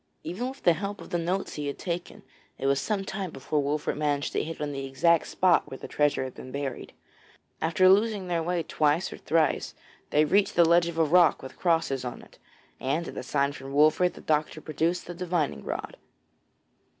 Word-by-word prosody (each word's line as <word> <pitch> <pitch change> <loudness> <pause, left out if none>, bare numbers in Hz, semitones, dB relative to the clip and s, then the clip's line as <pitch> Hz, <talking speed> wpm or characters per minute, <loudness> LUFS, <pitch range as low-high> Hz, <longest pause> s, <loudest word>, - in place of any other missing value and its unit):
Even 205 +10 -3
with 270 +1 -11
the 175 - +6
help 200 +5 -5
of - - -11
the 175 - 0
notes 180 +3 -2
he 150 -1 -4
had 140 - -4
taken, 175 -1 -5 0.3
it - - -5
was 140 0 +2
some 205 -3 -2
time 195 -1 -4
before 150 +1 -2
Wolfert 145 +2 -1
managed 145 -1 -1
to - - 0
hit 165 +1 -6
on 150 -1 -2
the 135 -1 -4
exact 165 +5 +2
spot 180 -2 +2
where 135 - -7
the - - -8
treasure 145 -2 +1
had 130 - -6
been 130 - -10
buried. 140 -2 -5 0.7
After 170 +3 +3
losing 200 0 +3
their 170 -2 0
way 175 0 -1
twice 155 +4 +1
or - - -9
thrice 160 -1 +1 0.3
they 150 +1 +4
reached 195 +5 +2
the 170 - +6
ledge 170 +1 +4
of 170 -1 -5
rock 175 -5 +5
with 130 - -7
the - - -23
crosses 165 -7 +1
on 125 -1 -6
it, - - -19 0.4
and 150 +6 -1
at - - -10
a - - -4
sign 140 +2 0
from 135 -1 -9
Wolfert 155 +5 +4
the - - -11
doctor 155 0 0
produced 165 +3 -1
the 175 - -6
divining 175 -4 -2
rod. - - -5
165 Hz, 210 wpm, -27 LUFS, 145-180 Hz, 0.7 s, the